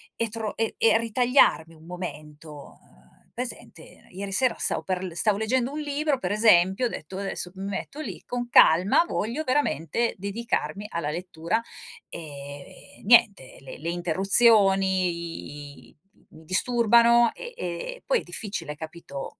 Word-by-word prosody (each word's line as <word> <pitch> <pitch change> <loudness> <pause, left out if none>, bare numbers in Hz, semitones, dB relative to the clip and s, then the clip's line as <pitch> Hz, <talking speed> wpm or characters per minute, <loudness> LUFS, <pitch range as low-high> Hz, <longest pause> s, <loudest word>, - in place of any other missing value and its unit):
e 230 -1 -1
tro 220 -1 -4
e 225 0 -2
e 225 0 +4
ritagliarmi 230 - +2
un 160 0 -18
momento, 155 -4 -8 0.3
uhm, - - -27
presente, 250 0 -7
ieri 195 +2 -6
sera 255 +5 +2
stavo - - +1
per 185 -1 -3
l 180 - -6
stavo 200 +3 +2
leggendo 245 +4 -1
un 300 - -5
libro, 290 -1 -1
per 180 -2 -3
esempio, 205 0 +4
ho - - 0
detto: 185 -2 -8
"Adesso 195 -2 -4
m 190 - -8
metto 200 +9 -6
lì, - - -7
con 245 -1 -5
calma, 185 - +5
voglio 240 +6 -3
veramente 235 - -1
dedicarmi 200 -3 -4
alla 170 -6 -4
lettura". 175 +4 -3 0.5
Ehm, 145 +2 -11
niente, 210 - +4
le 135 -1 -11
le 165 - -4
interruzioni, 185 -5 +2
i - - -25 0.4
mi 160 0 -15
disturbano, 235 +4 +4
e 485 0 -9
e 180 - -6
poi - - +2
è - - -13
difficile, 200 -8 -5
capito, 155 -3 -9
195 Hz, 145 wpm, -25 LUFS, 170-235 Hz, 0.5 s, calma